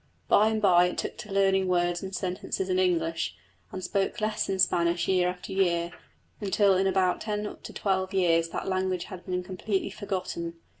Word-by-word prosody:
By 215 - +5
and 220 0 +1
by 180 -4 +5
it 180 - -5
took - - -3
to 220 -3 -9
learning 195 -1 +3
words 175 -1 +1
and 190 0 -5
sentences 185 +1 -3
in 185 0 +2
English, 165 -3 0 0.4
and 185 - -6
spoke 200 +3 -1
less 215 -1 -1
in 190 - 0
Spanish 175 -2 +2
year 180 -2 +3
after 180 +2 -7
year 170 -3 +1 0.5
until 200 0 +3
in 190 +1 +2
about 185 -1 +1
ten 210 -1 -3
to - - -8
twelve 190 -1 -1
years 165 -4 +2
that - - -4
language 185 -1 0
had 185 -3 -9
been 180 -1 -1
completely 190 +2 -2
forgotten. 185 -4 -4
185 Hz, 185 wpm, -28 LUFS, 180-195 Hz, 0.5 s, By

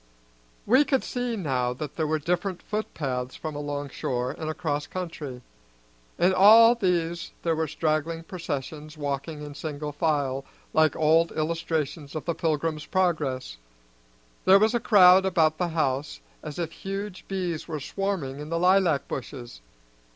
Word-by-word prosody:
We 255 +7 +5
could 270 -3 +1
see 245 -1 -2
now 130 - -1
that 150 +3 -7
there 160 -2 -1
were 155 +1 +1
different 175 +4 -2
footpaths 135 -12 -3
from 155 -2 -6
along 145 -1 -4
shore 125 -1 -2
and 155 - -5
across 150 -2 -2
country. 150 -8 -6 0.7
In 180 +2 +3
all 225 +5 +8
these 175 -6 -1
there 165 -1 +1
were 160 0 -1
straggling 155 +2 -1
processions 155 -3 -6
walking 145 +1 -4
in 145 -1 -7
single 150 0 -5
file, 145 -3 0 0.3
like 155 -1 +4
old 160 +2 +3
illustrations 155 -2 -2
of 155 - -4
the 170 - 0
Pilgrim's 155 -1 -1
Progress. 150 - -1 0.9
There 190 +1 +8
was 215 +3 +3
a 240 - +2
crowd 190 -4 +7
about 165 -5 +2
the 180 - +1
house 150 -3 -1 0.2
as 150 -2 -7
if 170 -2 -3
huge 195 +1 -6
bees 180 -4 -3
were 155 -3 -4
swarming 155 -4 -3
in 150 +1 -7
the 165 - -1
lilac 180 -4 +3
bushes. 120 - -7
160 Hz, 150 wpm, -26 LUFS, 145-180 Hz, 0.9 s, all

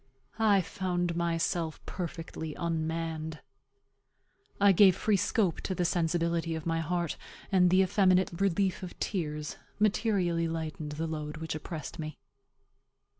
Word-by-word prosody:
I 210 -3 +5
found 175 -1 -2
myself 170 -1 0
perfectly 165 -3 -5
unmanned. 160 -1 -2 1.2
I 200 0 +7
gave 190 -1 +7
free 210 +2 +2
scope 190 -2 +1
to 190 - -2
the 180 - 0
sensibility 170 -1 0
of 160 - -5
my 165 -1 0
heart; 170 0 -1 0.3
and 180 -2 +5
the 185 +2 +5
effeminate 185 -1 +3
relief 195 -1 +1
of 180 -2 -7
tears 150 -6 -3 0.2
materially 200 -6 +2
lightened 160 -2 -4
the 160 +2 -2
load 155 -1 -4
which 160 0 -4
oppressed 155 0 -6
me. 155 -1 -5
170 Hz, 125 wpm, -30 LUFS, 160-185 Hz, 1.2 s, I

